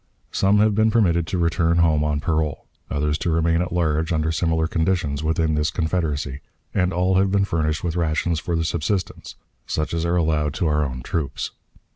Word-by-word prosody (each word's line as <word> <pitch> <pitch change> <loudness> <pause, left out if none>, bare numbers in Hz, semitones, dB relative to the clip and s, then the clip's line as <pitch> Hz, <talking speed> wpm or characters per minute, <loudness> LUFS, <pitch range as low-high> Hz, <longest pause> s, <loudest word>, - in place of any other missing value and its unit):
Some 100 +1 +3
have 105 0 +4
been 110 +2 +3
permitted 85 -8 +2
to 95 - -2
return 85 0 +1
home 80 -3 +3
on 75 -1 0
parole, 80 -2 -1 0.2
others 75 +2 -1
to - - -1
remain 85 +1 +2
at 90 - -3
large, 80 -2 0
under 80 -1 +1
similar 80 -1 +1
conditions, 80 -3 0
within 80 0 +1
this 75 0 +1
Confederacy, 80 -5 -2 0.3
and 90 -1 +1
all 90 +1 +1
have 95 0 +3
been 100 0 +2
furnished 80 -4 -1
with 85 -1 -2
rations 80 0 0
for 85 +1 -2
their 80 - 0
subsistence, 85 +4 -2 0.3
such 75 +1 -2
as 85 -1 -1
are 85 +1 +1
allowed 75 -3 +1
to - - -1
our 75 -1 +2
own 65 -3 -4
troops. 75 -2 -3
80 Hz, 190 wpm, -22 LUFS, 75-90 Hz, 0.3 s, have